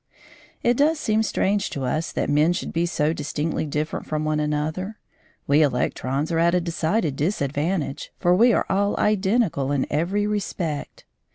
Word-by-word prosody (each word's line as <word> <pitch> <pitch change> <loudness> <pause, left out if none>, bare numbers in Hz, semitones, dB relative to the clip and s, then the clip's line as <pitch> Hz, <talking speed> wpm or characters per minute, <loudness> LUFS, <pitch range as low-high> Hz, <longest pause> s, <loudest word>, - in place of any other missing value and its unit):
It 240 0 +3
does 305 +2 +3
seem 220 -4 +1
strange 200 -2 0
to 140 - -4
us 155 +6 -1
that - - -1
men 150 +4 +3
should - - -4
be 170 +1 +1
so 155 -2 0
distinctly 155 +1 -2
different 150 +2 -3
from 155 0 -2
one 155 0 0
another. 155 +7 -2 0.5
We 145 +2 +4
electrons 135 +2 0
are 165 - +1
at 170 +1 +3
a - - +4
decided 165 -1 -1
disadvantage, 150 0 -2
for 175 - +3
we 235 +7 +5
are - - +2
all 200 +1 +1
identical 195 - +1
in 140 -2 +1
every 180 +8 0
respect. 180 -7 -3
165 Hz, 165 wpm, -23 LUFS, 150-200 Hz, 0.5 s, we